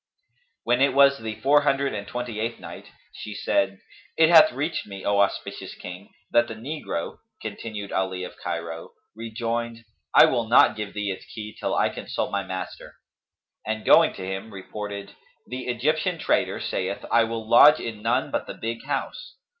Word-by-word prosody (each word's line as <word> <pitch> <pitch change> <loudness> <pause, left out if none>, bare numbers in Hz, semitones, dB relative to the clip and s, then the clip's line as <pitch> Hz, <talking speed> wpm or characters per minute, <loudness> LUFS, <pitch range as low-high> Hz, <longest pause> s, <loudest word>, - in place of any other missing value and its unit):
When 120 +2 +2
it 135 -1 +3
was 140 0 +6
the 110 -1 -5
Four 145 +2 +5
Hundred 140 0 +1
and 100 -1 -5
Twenty 120 -2 -5
eighth 115 +1 -3
Night, - - -10 0.3
She 105 -1 -8
said, 95 -1 0 0.4
It 160 0 +6
hath 160 -2 +8
reached 145 +3 -3
me, 100 -2 -9
O 100 0 +2
auspicious 100 - -1
King, 90 +2 -9 0.2
that 120 0 +4
the 115 - -7
negro 125 - -5 0.2
(continued 105 -3 -6
Ali 95 -1 -1
of 90 - -8
Cairo) 85 -1 -5 0.2
"rejoined, 115 +1 -4 0.3
'I - - +10
will 115 -1 0
not 120 - +6
give 105 -2 -6
thee 105 -1 -2
its 95 - -7
key 105 -1 -8
till - - -1
I - - +2
consult - - -4
my - - 0
master,'" 95 0 -7 0.7
and 110 0 -4
going - - +6
to 95 - -6
him, 95 +3 -5
reported, 100 +1 -7 0.3
"'The 125 0 -6
Egyptian 155 +8 0
trader - - 0
saith, - - -3
'I 115 - +5
will 115 -1 -5
lodge 145 +6 +8
in 110 -2 -6
none 120 +4 0
but - - -2
the - - -6
big 115 +1 -5
house.'" - - -4
115 Hz, 175 wpm, -25 LUFS, 100-125 Hz, 0.7 s, I